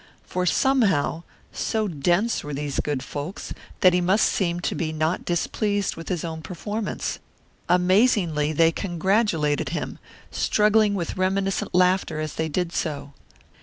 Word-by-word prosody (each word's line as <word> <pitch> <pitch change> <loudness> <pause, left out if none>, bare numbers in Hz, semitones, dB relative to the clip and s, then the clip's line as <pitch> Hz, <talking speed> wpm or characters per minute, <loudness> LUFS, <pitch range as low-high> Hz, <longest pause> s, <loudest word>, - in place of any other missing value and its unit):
For 180 0 -2
somehow, 200 - +2 0.3
so 220 -1 -1
dense 175 +7 +1
were 145 -1 -5
these 145 0 -3
good 145 -3 -1
folks, 145 +7 -6 0.3
that 185 -1 +6
he 180 - +2
must 190 +5 +3
seem 175 -3 0
to - - -1
be 160 -2 -2
not 160 +3 -1
displeased 200 +3 -1
with 165 - -8
his 175 -3 -2
own 160 -1 -5
performance. 205 +6 -4 0.5
Amazingly 180 -4 +3
they 165 +1 +4
congratulated 175 -4 0
him, - - -4 0.3
struggling 210 -1 +3
with 175 -2 -3
reminiscent 190 0 0
laughter 180 -3 +2
as 155 -1 -3
they 160 0 -2
did 175 +2 -1
so. 145 -3 -3
180 Hz, 140 wpm, -24 LUFS, 160-200 Hz, 0.5 s, that